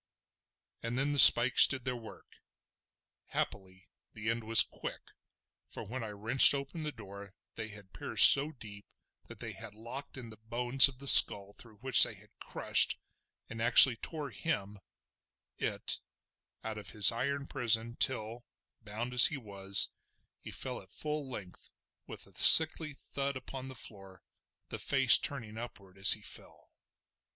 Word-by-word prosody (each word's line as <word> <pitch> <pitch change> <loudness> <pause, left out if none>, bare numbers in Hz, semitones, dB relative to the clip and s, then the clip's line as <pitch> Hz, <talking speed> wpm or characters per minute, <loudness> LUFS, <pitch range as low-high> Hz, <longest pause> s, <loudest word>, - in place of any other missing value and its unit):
And 115 +2 -8
then 140 +2 -4
the 145 - -3
spikes 120 0 +7
did 130 -2 -7
their 125 -1 -6
work. 115 -2 -18 0.9
Happily 95 -1 -9 0.3
the 110 +1 -6
end 115 0 -8
was 115 +1 +5
quick, - - -14 0.6
for - - -12
when 125 +3 -10
I 110 - -10
wrenched 110 +7 +3
open 140 +4 -10
the 155 -1 -8
door 100 -4 -16 0.2
they 110 -1 -10
had 100 -2 -16
pierced - - +4
so 145 +3 -2
deep 105 -7 -15 0.4
that - - -16
they - - -10
had 110 -2 -14
locked 120 +6 -13
in 120 -3 -13
the 110 - -17
bones 120 +4 +1
of 135 -2 -15
the 140 +1 -11
skull 100 -5 +5
through 115 0 -18
which 130 0 +4
they - - +4
had - - -20
crushed, - - -1 0.5
and 115 0 -12
actually 120 +1 +4
tore 145 +4 -10
him—it—out 105 -10 -9 0.8
of 105 - -13
his 105 -2 +1
iron 140 +4 -7
prison 115 -4 -3
till, 120 -2 -4 0.4
bound 115 +3 -9
as 125 - +6
he 150 - -9
was, 100 -4 0 0.5
he - - -15
fell 125 -1 -10
at 95 0 -19
full 150 0 -9
length 100 -8 -13 0.4
with - - -11
a - - -20
sickly 160 -1 +4
thud 140 0 -8
upon 130 0 -13
the 130 - -13
floor, 95 -5 -11 0.5
the - - -10
face 135 -3 +3
turning 115 -6 -9
upward 100 -5 -15
as 95 0 +4
he 105 - -8
fell. - - -11
115 Hz, 155 wpm, -27 LUFS, 105-135 Hz, 0.9 s, spikes